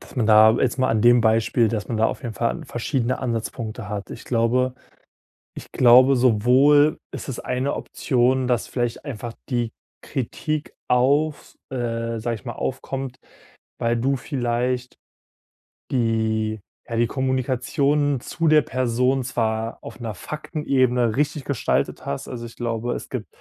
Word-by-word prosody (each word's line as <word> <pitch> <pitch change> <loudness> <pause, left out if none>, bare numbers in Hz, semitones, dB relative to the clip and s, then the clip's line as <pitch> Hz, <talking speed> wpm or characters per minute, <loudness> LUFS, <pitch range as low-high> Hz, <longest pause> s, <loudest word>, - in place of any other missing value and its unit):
dass - - -15
man 120 - +1
da- 110 0 +8
jetzt 130 +1 0
mal 130 - +2
an 110 -2 +1
dem 120 0 +6
Beispiel- 115 +1 +3
dass 105 -1 -3
man 115 - -2
da 110 - +4
auf - - -4
jeden 120 - -4
Fall 140 +8 -1
verschiedene 125 0 -1
Ansatzpunkte 115 -2 -4
hat. 100 -2 -5
Ich - - -9
glaube 125 +2 +1 0.8
ich - - -10
glaube, 130 +2 +6
sowohl 130 +6 +4 0.2
ist - - -7
es 130 - -4
eine 130 +3 -1
Option, 130 0 +1
dass 120 -2 +1
vielleicht 120 +1 -2
einfach 120 -4 -6 0.2
die 120 -3 -1 0.3
Kritik 150 +3 -3 0.2
auf 140 +5 +1 0.2
äh, 115 -2 -2
sag 115 +1 -1
ich 100 - -15
mal, - - -4
aufkommt, 135 -1 -4 0.6
weil 115 0 +1
du 135 +4 +1
vielleicht 125 -1 -2 1.0
die 110 -3 0 0.3
ja, 115 - -2
die 120 - +3
Kommunikation 130 +3 0
zu 165 -1 -2
der 155 -1 +6
Person 125 +2 0
zwar 115 -2 -2
auf - - -10
'ner 115 -2 -4
Faktenebene 130 - 0
richtig 145 -1 0
gestaltet 140 -5 -1
hast, 70 - -4
also 120 -2 -6
ich 115 - -11
glaube, 120 0 -2
es - - -7
gibt - - -5
125 Hz, 150 wpm, -23 LUFS, 115-130 Hz, 1.0 s, da